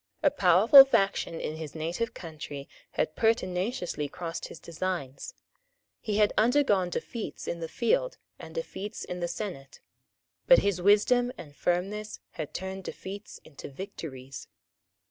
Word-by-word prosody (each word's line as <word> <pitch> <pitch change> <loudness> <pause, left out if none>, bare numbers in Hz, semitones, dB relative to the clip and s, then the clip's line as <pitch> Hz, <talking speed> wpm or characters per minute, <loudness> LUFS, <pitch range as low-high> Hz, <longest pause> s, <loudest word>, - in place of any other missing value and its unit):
A 290 - +5
powerful 215 +3 +8
faction 195 -9 +1
in 155 - -4
his 160 -2 -7
native 175 +9 -3
country 150 -4 -7 0.3
had 155 - -1
pertinaciously 185 - 0
crossed 165 +2 -5
his - - -11
designs. 170 - -4 0.6
He 210 -2 -2
had 210 -1 +4
undergone 215 -6 +3
defeats 225 +5 -5
in 170 - -3
the 165 - -4
field 240 - 0 0.2
and - - -10
defeats 220 - -5
in 180 - -5
the 175 - -1
senate; 170 -9 -6 0.7
but - - +9
his 195 -3 +1
wisdom 230 +6 +4
and 145 -3 -11
firmness 200 +6 -2
had 155 -4 -6
turned 190 +1 -5
defeats 200 +3 -8
into 145 -2 -10
victories. 135 - -8
185 Hz, 135 wpm, -28 LUFS, 165-215 Hz, 0.7 s, but